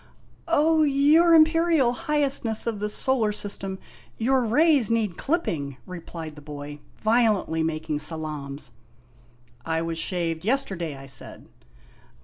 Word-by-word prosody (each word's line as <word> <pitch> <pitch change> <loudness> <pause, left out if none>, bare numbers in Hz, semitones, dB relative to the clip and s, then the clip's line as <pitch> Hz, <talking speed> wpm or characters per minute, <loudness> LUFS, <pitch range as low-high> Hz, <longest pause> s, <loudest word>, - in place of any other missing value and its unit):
" - - -31
" - - -32
O 320 -1 +3
your 305 +4 +5
Imperial 320 -5 +4
Highestness 270 -5 0
of 225 -3 -2
the 210 +1 -2
Solar 230 -1 +1
System, 200 -2 -4 0.4
your 255 +3 +2
rays 270 +1 +3
need 220 -6 0
clipping! 160 - -2
" - - -32
replied 165 -2 -8
the 150 - -12
boy 145 0 -8 0.2
violently 215 -7 +2
making 155 -1 -2
salaams. 150 -4 -6 0.5
" 120 0 -30 0.3
I 160 +2 -1
was 165 0 -3
shaved 165 -2 -2
yesterday," 190 - -1
I 135 - -11
said. 135 -1 -7
205 Hz, 135 wpm, -25 LUFS, -, 0.5 s, your